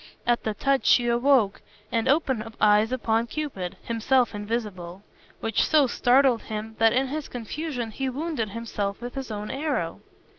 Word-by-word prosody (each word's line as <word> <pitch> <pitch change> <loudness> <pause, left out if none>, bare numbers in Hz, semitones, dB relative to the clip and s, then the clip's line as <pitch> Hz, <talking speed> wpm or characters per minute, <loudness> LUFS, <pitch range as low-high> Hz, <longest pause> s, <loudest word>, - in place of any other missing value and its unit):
At 240 0 +2
the 215 -1 -2
touch 275 +4 +1
she 245 - +5
awoke, 240 -3 +3 0.3
and 230 +1 0
opened 260 -6 0
eyes 210 +2 +4
upon 230 -2 0
Cupid 235 -12 -4
(himself 235 +2 +1
invisible), 205 -4 -4 0.4
which 225 -2 +1
so 305 -3 +4
startled 250 0 +3
him 220 +1 -6
that 225 0 +5
in 260 +2 +1
his 300 +1 -4
confusion 245 0 -4
he 265 +4 -2
wounded 280 -4 -3
himself 205 -2 -4
with 245 0 -7
his 270 -3 -5
own 210 -1 -5
arrow. 270 - -2
235 Hz, 155 wpm, -25 LUFS, 215-270 Hz, 0.4 s, she